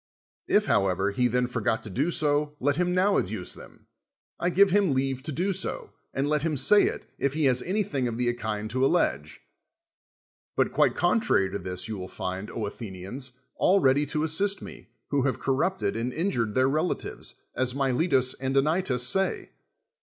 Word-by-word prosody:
If, -, -, +3 dB
however, 95 Hz, +1 st, +1 dB
he 125 Hz, +4 st, +1 dB
then 125 Hz, +1 st, +1 dB
forgot 115 Hz, -2 st, -1 dB
to -, -, -7 dB
do 140 Hz, -, 0 dB
so, 150 Hz, -2 st, +1 dB
let 145 Hz, +2 st, +1 dB
him 180 Hz, 0 st, +1 dB
now 195 Hz, +2 st, +3 dB
adduce 95 Hz, -1 st, -4 dB
them, -, -, -15 dB, 0.5 s
I 175 Hz, -, +1 dB
give 195 Hz, +2 st, +4 dB
him 195 Hz, -7 st, +3 dB
leave 135 Hz, 0 st, -1 dB
to 155 Hz, +3 st, -5 dB
do 180 Hz, +7 st, 0 dB
so, 190 Hz, -, -2 dB, 0.2 s
and 135 Hz, +2 st, -1 dB
let 150 Hz, 0 st, +1 dB
him 155 Hz, -1 st, -1 dB
say 205 Hz, +9 st, +6 dB
it, -, -, -5 dB
if 140 Hz, +1 st, 0 dB
he 155 Hz, -2 st, +1 dB
has 125 Hz, -2 st, +3 dB
anything 180 Hz, -10 st, -1 dB
of 115 Hz, -1 st, -4 dB
the 120 Hz, 0 st, +1 dB
kind 110 Hz, -2 st, -4 dB
to 130 Hz, +2 st, 0 dB
allege. 105 Hz, -, 0 dB, 1.1 s
But -, -, +1 dB
quite -, -, +2 dB
contrary 175 Hz, -, +2 dB
to 100 Hz, -, -3 dB
this, 90 Hz, 0 st, -3 dB
you 110 Hz, -3 st, -5 dB
will 90 Hz, -, -6 dB
find, 95 Hz, +3 st, -5 dB
Athenians, 110 Hz, +3 st, -5 dB, 0.3 s
aJi 195 Hz, 0 st, +4 dB
ready 135 Hz, +2 st, +4 dB
to 150 Hz, +2 st, 0 dB
assist 195 Hz, +6 st, +2 dB
me, -, -, -11 dB, 0.2 s
who 140 Hz, -1 st, +2 dB
have 130 Hz, 0 st, 0 dB
corrupted 140 Hz, -, 0 dB
and 115 Hz, +2 st, -2 dB
in 175 Hz, +9 st, -1 dB
jured 115 Hz, -4 st, -1 dB
their 130 Hz, 0 st, +4 dB
relatives, 155 Hz, +6 st, -2 dB, 0.2 s
as 130 Hz, 0 st, 0 dB
Miletus 135 Hz, -1 st, +2 dB
and 135 Hz, +1 st, -2 dB
Anytus 145 Hz, -3 st, +1 dB
say. 195 Hz, 0 st, 0 dB
135 Hz, 185 wpm, -26 LUFS, 115-160 Hz, 1.1 s, say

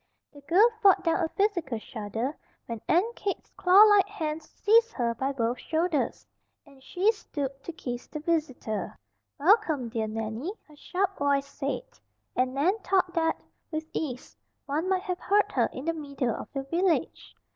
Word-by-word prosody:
The 285 Hz, -, -13 dB
girl 360 Hz, +10 st, +5 dB
fought 395 Hz, -3 st, +6 dB
down 335 Hz, +1 st, +1 dB
a 320 Hz, -, 0 dB
physical 345 Hz, -, 0 dB
shudder 225 Hz, +4 st, -4 dB, 0.3 s
when 230 Hz, -2 st, -6 dB
Aunt 420 Hz, +8 st, +2 dB
Kate's 400 Hz, -1 st, -4 dB
clawlike 405 Hz, +2 st, +6 dB
hands 315 Hz, -6 st, -4 dB
seized 460 Hz, +2 st, +3 dB
her 235 Hz, -2 st, 0 dB
by 265 Hz, +4 st, -1 dB
both 240 Hz, -2 st, -1 dB
shoulders, 320 Hz, -2 st, -1 dB, 0.4 s
and 275 Hz, -2 st, -19 dB
she 375 Hz, +10 st, +2 dB
stooped 280 Hz, -, -5 dB
to -, -, -4 dB
kiss 245 Hz, -6 st, -6 dB
the 305 Hz, -, -6 dB
visitor. 295 Hz, -9 st, -2 dB, 0.4 s
"Welcome, 315 Hz, -, +3 dB
dear 225 Hz, -1 st, -2 dB
Nannie," 225 Hz, -, -4 dB
her 305 Hz, -, -17 dB
sharp 380 Hz, +6 st, -2 dB
voice 280 Hz, -1 st, +2 dB
said, 280 Hz, -, -4 dB, 0.5 s
and 255 Hz, +1 st, +1 dB
Nan 360 Hz, +10 st, +2 dB
thought 370 Hz, -2 st, +1 dB
that, 325 Hz, -1 st, 0 dB, 0.3 s
with 315 Hz, -1 st, -3 dB
ease, 255 Hz, -5 st, -4 dB, 0.3 s
one 305 Hz, +6 st, -1 dB
might 375 Hz, -1 st, +1 dB
have 365 Hz, -3 st, -3 dB
heard 410 Hz, +2 st, +2 dB
her -, -, +2 dB
in 260 Hz, -, -7 dB
the 330 Hz, -, +1 dB
middle 280 Hz, -6 st, -2 dB
of -, -, -8 dB
the 275 Hz, -1 st, -3 dB
village. 335 Hz, +5 st, -1 dB
310 Hz, 165 wpm, -28 LUFS, 265-370 Hz, 0.5 s, fought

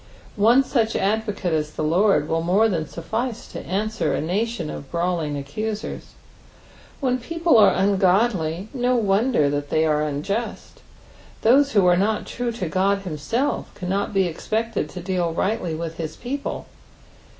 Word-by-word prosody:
'' -, -, -22 dB
One 230 Hz, +6 st, +5 dB
such 230 Hz, -4 st, 0 dB
advocate 205 Hz, -3 st, 0 dB
as 155 Hz, -1 st, -1 dB
the -, -, -3 dB
Lord 170 Hz, 0 st, +3 dB
will 165 Hz, 0 st, 0 dB
more 190 Hz, +7 st, +3 dB
than 165 Hz, -7 st, -1 dB
suffice 225 Hz, -, -4 dB
to -, -, -7 dB
answer 215 Hz, +4 st, -1 dB
a -, -, -1 dB
nation 190 Hz, +1 st, -2 dB
of 140 Hz, -, -8 dB
brawling 170 Hz, -4 st, -1 dB
accusers. 210 Hz, +11 st, -5 dB, 0.9 s
When 255 Hz, -2 st, 0 dB
people 330 Hz, +5 st, +1 dB
are -, -, +8 dB
ungodly, 190 Hz, -2 st, +2 dB
no 250 Hz, -1 st, +1 dB
wonder 210 Hz, -, +2 dB
that 145 Hz, 0 st, -3 dB
they 160 Hz, 0 st, +2 dB
are 150 Hz, -1 st, +2 dB
unjust; 175 Hz, +10 st, -3 dB, 0.6 s
those 275 Hz, +5 st, +5 dB
who 200 Hz, -4 st, +4 dB
are 180 Hz, 0 st, +5 dB
not 210 Hz, +3 st, 0 dB
true 245 Hz, 0 st, -3 dB
to 210 Hz, -6 st, -4 dB
God 195 Hz, +3 st, +1 dB
himself 195 Hz, -, -2 dB
cannot 195 Hz, +2 st, -2 dB
be 195 Hz, -2 st, +2 dB
expected 215 Hz, +1 st, -2 dB
to 180 Hz, -, -7 dB
deal 175 Hz, -2 st, -1 dB
rightly 180 Hz, -3 st, -1 dB
with 165 Hz, 0 st, -5 dB
his 160 Hz, -2 st, -5 dB
people. 275 Hz, +4 st, -4 dB
195 Hz, 155 wpm, -23 LUFS, 165-225 Hz, 0.9 s, are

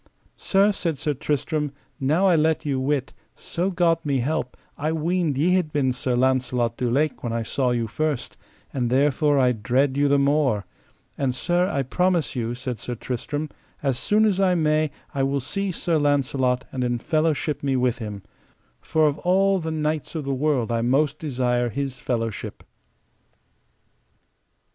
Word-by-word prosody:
Sir, 200 Hz, +1 st, +3 dB
said 170 Hz, -6 st, -2 dB
Sir 150 Hz, +2 st, -1 dB
Tristram, 150 Hz, +2 st, -1 dB, 0.3 s
now 155 Hz, +8 st, +2 dB
I 185 Hz, -3 st, +5 dB
let 155 Hz, 0 st, +1 dB
you 140 Hz, -3 st, 0 dB
wit, 135 Hz, 0 st, -1 dB, 0.2 s
so 180 Hz, +3 st, -2 dB
God 175 Hz, -3 st, +2 dB
me 140 Hz, -2 st, 0 dB
help, 130 Hz, 0 st, -2 dB, 0.2 s
I 155 Hz, +2 st, -1 dB
weened 160 Hz, -2 st, 0 dB
ye 170 Hz, +6 st, +3 dB
had 180 Hz, -5 st, +1 dB
been 140 Hz, -3 st, +1 dB
Sir 125 Hz, 0 st, -1 dB
Launcelot 125 Hz, -2 st, +1 dB
du 125 Hz, 0 st, -1 dB
Lake 145 Hz, +4 st, 0 dB
when 120 Hz, -, -2 dB
I 115 Hz, 0 st, -1 dB
saw 130 Hz, +3 st, 0 dB
you 120 Hz, -1 st, 0 dB
first, 150 Hz, +4 st, -2 dB, 0.4 s
and 125 Hz, -3 st, 0 dB
therefore 145 Hz, +3 st, +3 dB
I 130 Hz, -2 st, +4 dB
dread 130 Hz, +4 st, +1 dB
you 145 Hz, 0 st, +3 dB
the 140 Hz, 0 st, +4 dB
more; 140 Hz, -7 st, +2 dB, 0.5 s
and 130 Hz, -3 st, 0 dB
sir, 175 Hz, +6 st, +1 dB
I 140 Hz, -8 st, 0 dB
promise 175 Hz, +3 st, 0 dB
you, 120 Hz, -1 st, -2 dB
said 125 Hz, -2 st, -5 dB
Sir 120 Hz, -, -4 dB
Tristram, 145 Hz, +6 st, -4 dB, 0.3 s
as 135 Hz, -3 st, +1 dB
soon 215 Hz, +7 st, +3 dB
as 200 Hz, -3 st, +2 dB
I 185 Hz, -2 st, +3 dB
may 155 Hz, -1 st, +2 dB, 0.2 s
I 140 Hz, -, -1 dB
will 135 Hz, +1 st, +1 dB
see 195 Hz, +9 st, -3 dB
Sir 165 Hz, -2 st, 0 dB
Launcelot 135 Hz, -3 st, +1 dB
and 130 Hz, -, -2 dB
in 120 Hz, -1 st, 0 dB
fellowship 155 Hz, +2 st, 0 dB
me 140 Hz, -1 st, 0 dB
with 125 Hz, -1 st, +1 dB
him; 105 Hz, -3 st, -6 dB, 0.6 s
for 155 Hz, -1 st, +2 dB
of 145 Hz, 0 st, -1 dB
all 195 Hz, +2 st, +3 dB
the 160 Hz, -1 st, -4 dB
knights 155 Hz, 0 st, -2 dB
of 155 Hz, -, -2 dB
the 140 Hz, 0 st, -2 dB
world 130 Hz, -4 st, 0 dB
I 115 Hz, 0 st, +1 dB
most 140 Hz, +5 st, +1 dB
desire 125 Hz, -4 st, 0 dB
his 135 Hz, +2 st, -3 dB
fellowship. 115 Hz, -3 st, -3 dB
140 Hz, 170 wpm, -24 LUFS, 125-155 Hz, 0.6 s, I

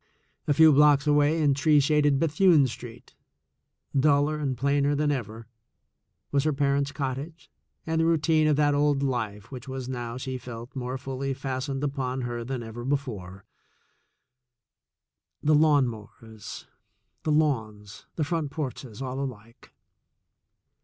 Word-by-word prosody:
A 145 Hz, -, +3 dB
few 160 Hz, 0 st, +7 dB
blocks 145 Hz, -1 st, +5 dB
away 150 Hz, +2 st, +3 dB
in 145 Hz, -2 st, +4 dB
tree 150 Hz, +2 st, +4 dB
shaded 145 Hz, 0 st, +3 dB
Bethune 160 Hz, 0 st, +4 dB
Street, 120 Hz, -1 st, -9 dB, 0.8 s
duller 145 Hz, +2 st, +3 dB
and 135 Hz, -4 st, -2 dB
plainer 140 Hz, +2 st, +1 dB
than 145 Hz, 0 st, +1 dB
ever, 115 Hz, -4 st, -5 dB, 0.9 s
was 140 Hz, -1 st, +2 dB
her 155 Hz, -, +1 dB
parents' 140 Hz, 0 st, +1 dB
cottage 145 Hz, +4 st, -5 dB, 0.3 s
and 160 Hz, 0 st, 0 dB
the -, -, +2 dB
routine 160 Hz, -1 st, +3 dB
of 150 Hz, -, +3 dB
that 145 Hz, 0 st, +3 dB
old 145 Hz, -1 st, +2 dB
life 110 Hz, -6 st, -3 dB
which 130 Hz, 0 st, -8 dB
was 130 Hz, -1 st, -5 dB
now, 120 Hz, -2 st, -5 dB
she 130 Hz, 0 st, -5 dB
felt, 120 Hz, +1 st, -9 dB
more 130 Hz, 0 st, -3 dB
fully 135 Hz, 0 st, -4 dB
fastened 135 Hz, +1 st, -4 dB
upon 135 Hz, -2 st, -2 dB
her 120 Hz, -1 st, -4 dB
than 125 Hz, 0 st, -4 dB
ever 115 Hz, +1 st, -8 dB
before 110 Hz, -9 st, -4 dB, 1.4 s
— -, -, -56 dB
the 155 Hz, -, +3 dB
lawn 150 Hz, -3 st, +4 dB
mowers, 110 Hz, -1 st, -9 dB, 0.6 s
the 155 Hz, -, -1 dB
lawns, 110 Hz, -9 st, -1 dB
the 160 Hz, -, 0 dB
front 160 Hz, -1 st, -2 dB
porches 135 Hz, -5 st, -6 dB
all 130 Hz, 0 st, -4 dB
alike. 115 Hz, -3 st, -8 dB
135 Hz, 140 wpm, -26 LUFS, 125-150 Hz, 1.4 s, few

